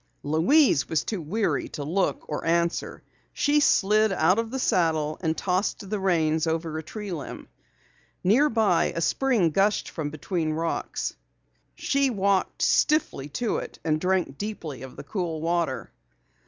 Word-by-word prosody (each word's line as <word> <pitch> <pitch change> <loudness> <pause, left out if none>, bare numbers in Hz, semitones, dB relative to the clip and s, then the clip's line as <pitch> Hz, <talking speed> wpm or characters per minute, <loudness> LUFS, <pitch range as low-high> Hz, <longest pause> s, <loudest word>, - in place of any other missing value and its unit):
Louise 165 - +3
was 160 -1 +1
too 210 -5 -3
weary 200 +8 -1
to 145 - -6
look 180 +7 -1
or 150 - -4
answer. 170 +1 0 0.3
She 295 +1 +2
slid 215 -5 +3
out 185 +3 +3
of 230 -1 -2
the 265 - -4
saddle 160 - +1
and 160 -2 -1
tossed 190 +2 -1
the 210 +1 -2
reins 160 -4 +1
over 160 0 -2
a 160 - -2
tree 205 +5 -7
limb. 155 -6 -6 0.8
Near 250 +11 +4
by 220 -7 +2
a - - -1
spring 215 -2 +2
gushed 195 +5 +1
from 155 -3 -3
between 155 +2 -2
the 155 - -1
rocks. 165 +1 -2 0.6
She 275 -1 +1
walked 200 -4 0
stiffly 295 - +2
to 235 -3 -1
it - - -6
and 155 -1 +1
drank 180 -7 0
deeply 170 - -5
of 130 -1 -9
the - - -8
cool 165 0 -3
water. 165 -4 -1
175 Hz, 155 wpm, -26 LUFS, 160-210 Hz, 0.8 s, Near